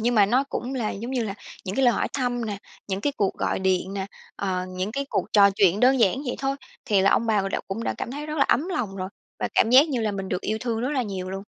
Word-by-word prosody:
nhưng 240 +2 +1
mà 205 -2 +6
nó 255 +6 +2
cũng 265 -1 -4
là 230 -4 -1
giống 230 +6 -5
như 250 -3 0
là 200 -2 -4 0.3
những 190 - -4
cái 270 - +3
lời 240 - +5
hỏi - - 0
thăm 245 -3 -1
nè, 205 -2 -4 0.3
những 190 0 -2
cái 285 +6 0
cuộc 200 -2 +1
gọi - - -1
điện 190 0 0
nè, 195 -1 -3 0.3
ờ, 185 -2 -2
những 185 +3 -3
cái 280 +1 -2
cuộc - - -1
trò 200 -1 +7
chuyện 195 0 +3
đơn 260 +1 +5
giản 230 +5 +3
vậy 245 - -2
thôi 275 0 -1 0.3
thì 200 -3 +3
là 195 - +4
ông 230 - +2
bà 210 -3 +2
đã - - -1
cũng 225 +4 -3
đã - - -1
cảm - - -4
thấy 295 +3 -5
rất 305 0 -4
là - - +5
ấm 315 +8 +2
lòng 220 - -2
rồi 185 0 -4 0.3
và - - -1
cảm 225 - +4
giác 275 +5 +7
như 255 -5 -1
là 215 -2 0
mình 195 -1 -4
được 180 - -1
yêu 220 +1 -2
thương 230 -2 -2
rất 255 +4 -1
là 265 -4 0
nhiều 190 -3 -5
luôn. 195 +1 -5
220 Hz, 295 wpm, -25 LUFS, 195-255 Hz, 0.3 s, trò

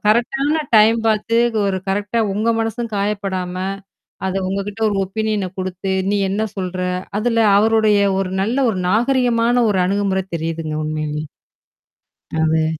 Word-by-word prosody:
கரெக்ட்டான 270 +8 +2
டைம் 220 +2 +6
பாத்து 220 +1 +1 0.3
ஒரு 190 -1 0
கரெக்ட்டா 205 +4 -1
உங்க 215 +3 -1
மனசும் 225 +1 -2
காயப்படாம, 195 -3 -2 0.7
அத 190 - -2
உங்ககிட்ட 200 +2 -4
ஒரு 205 - -1
ஒப்பினியன 210 -1 -2
குடுத்து, 185 +1 -3 0.2
நீ 205 - +1
என்ன 205 +3 -1
சொல்ற? 185 -1 -3 0.4
அதுல 230 +1 0 0.2
அவருடைய 215 -1 +3 0.2
ஒரு 185 -1 -2
நல்ல 230 +6 -1
ஒரு 190 - -3
நாகரீகமான 240 +1 +2 0.2
ஒரு 190 - +1
அணுகுமுறை 195 0 0
தெரியுதுங்க 160 -1 -3
உண்மையிலே. 155 -1 -3 1.2
அதுவே 160 0 +2
205 Hz, 125 wpm, -19 LUFS, 185-225 Hz, 1.2 s, டைம்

